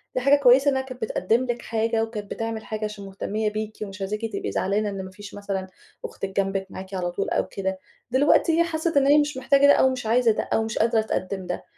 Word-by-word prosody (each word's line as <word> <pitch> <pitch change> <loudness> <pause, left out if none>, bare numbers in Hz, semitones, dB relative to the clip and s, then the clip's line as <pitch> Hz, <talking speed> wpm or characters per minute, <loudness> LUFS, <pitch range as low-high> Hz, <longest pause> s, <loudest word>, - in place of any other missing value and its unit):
"دي 255 - +1
حاجة 275 +3 +5
كويسة 270 +2 +6
إنها 265 -1 0
كانت 255 -2 -10
بتقدّم 220 +3 +1
لك 240 -1 -3
حاجة 225 0 0
وكانت 215 -3 -6
بتعمل 225 -1 -4
حاجة 215 0 -3
عشان 210 -1 -7
مهتمية 210 +2 -2
بيكِ 215 0 -5
ومش 200 -1 -8
عايزاكِ 210 +3 -3
تبقي - - -3
زعلانة 205 +2 0
إن 195 -1 -5
ما 185 - -10
فيش 205 +1 -11
مثلًا 195 -2 -4 0.4
أختِك 195 - -5
جنبِك، 195 0 0
معاكِ 190 +1 -9
على 180 -2 -2
طُول 195 - -2
أو - - 0
كده. 190 -1 -3 0.3
دلوقتي 300 +5 +4
هي - - +6
حسِّت 325 -1 -1
إن 275 -1 +4
هي 290 +1 +6
مش 295 -2 +1
محتاجة 275 +2 +4
ده 285 - +8
أو 265 - +4
مش 255 -3 -4
عايزة 230 +1 +3
ده - - -1
أو 225 - +2
مش 220 0 -4
قادرة 225 0 +3
تقدّم 190 -3 -3
ده، 180 - -4
220 Hz, 235 wpm, -24 LUFS, 195-255 Hz, 0.4 s, ده